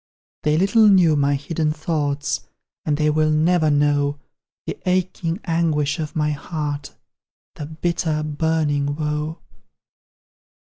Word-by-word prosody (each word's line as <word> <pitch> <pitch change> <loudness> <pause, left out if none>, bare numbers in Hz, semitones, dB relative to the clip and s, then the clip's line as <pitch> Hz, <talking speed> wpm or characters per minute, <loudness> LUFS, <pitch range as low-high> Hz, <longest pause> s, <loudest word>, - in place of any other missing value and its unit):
They 150 0 +2
little 210 +5 +4
knew 180 -6 +5
my 140 0 +2
hidden 150 +2 -1
thoughts; 150 -2 -2 0.4
And 150 -2 +1
they 150 0 +2
will 155 0 +2
NEVER 155 +1 +3
know 145 0 +2 0.5
The - - -5
aching 180 -1 0
anguish 165 -3 0
of 155 -1 -4
my 150 -1 +1
heart, 145 -1 -4 0.6
The 145 - -7
bitter 160 -1 -1
burning 150 -2 0
woe! 150 +1 -2
155 Hz, 115 wpm, -22 LUFS, 145-165 Hz, 0.6 s, knew